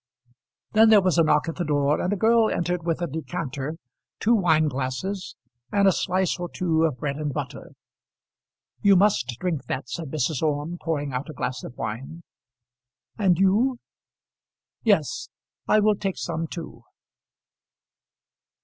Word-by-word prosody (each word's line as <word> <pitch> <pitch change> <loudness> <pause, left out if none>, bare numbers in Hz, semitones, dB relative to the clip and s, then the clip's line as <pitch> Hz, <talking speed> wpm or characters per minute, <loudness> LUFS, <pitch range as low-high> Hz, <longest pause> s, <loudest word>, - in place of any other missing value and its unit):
Then 220 +1 +6
there 215 -2 +8
was 185 -3 +2
a - - +6
knock 150 0 +2
at 165 - -4
the 175 - -1
door, 145 -1 +1
and 180 - -1
a - - +1
girl 225 +2 +4
entered 175 0 -1
with 170 +1 -1
a - - 0
decanter, 150 -1 -4 0.4
two 230 - +3
wine 160 -7 +3
glasses, 140 +9 -3 0.4
and 200 -1 +3
a - - +7
slice 185 0 0
or 175 -1 -4
two 165 -2 +1
of 150 -6 -1
bread 140 -1 -3
and 150 -1 -2
butter. - - -6 1.1
"You 200 -1 +6
must 200 +2 +3
drink 175 -6 -2
that," 130 -1 -4
said 165 -4 -5
Mrs. 150 -1 -1
Orme, 155 +2 -1
pouring 145 -4 -2
out 130 +5 -3
a - - -6
glass 125 -1 -4
of 120 - -9
wine. 135 +10 -5 1.0
"And 185 -5 +3
you?" 215 +8 +3 1.0
"Yes, - - +1 0.4
I 215 - +5
will 210 0 +4
take 195 -2 -3
some 165 -1 -3
too. 165 0 -8
165 Hz, 155 wpm, -25 LUFS, 145-190 Hz, 1.1 s, there